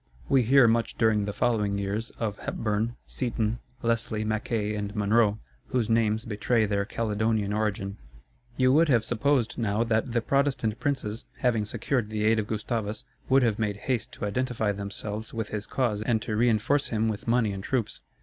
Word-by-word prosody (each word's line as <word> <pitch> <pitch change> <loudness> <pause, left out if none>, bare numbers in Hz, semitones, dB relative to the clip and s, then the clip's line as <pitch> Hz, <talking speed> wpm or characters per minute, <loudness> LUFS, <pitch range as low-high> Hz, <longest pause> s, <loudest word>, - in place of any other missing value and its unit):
We 135 -2 +4
hear 125 +1 +6
much 115 +1 +1
during 110 -2 +3
the 105 - -2
following 105 -3 +1
years, 100 +3 -2
of 105 -3 -3
Hepburn, 110 +2 -2
Seaton, 115 -2 -2 0.2
Leslie, 115 -2 0
Mackay, 110 0 -1
and 105 0 -4
Monroe, 105 0 +3 0.3
whose 120 -3 0
names 110 0 +2
betray 110 +1 +1
their 100 -1 0
Caledonian 110 -1 0
origin. 100 -2 -1 0.6
You 130 0 +4
would 160 +2 +4
have 120 -5 +4
supposed 125 0 +1
now 110 0 +1
that 115 +2 0
the 120 0 +1
Protestant 130 -4 0
princes, 125 -6 -2 0.2
having 115 -4 +2
secured 115 +1 -1
the 105 -1 -2
aid 110 +1 +4
of 105 - -2
Gustavus, 110 +1 -3 0.2
would 135 0 +5
have 115 -3 +1
made 105 -2 -1
haste 120 +2 -2
to - - -4
identify 110 -1 0
themselves 105 +2 -5
with 110 -2 -3
his 105 -1 -4
cause 115 -6 0
and 110 0 +1
to 110 - -2
reinforce 120 +5 +2
him 110 0 0
with 110 0 -3
money 115 -2 +2
and 95 0 -6
troops. 125 -2 -2
110 Hz, 175 wpm, -27 LUFS, 105-120 Hz, 0.6 s, hear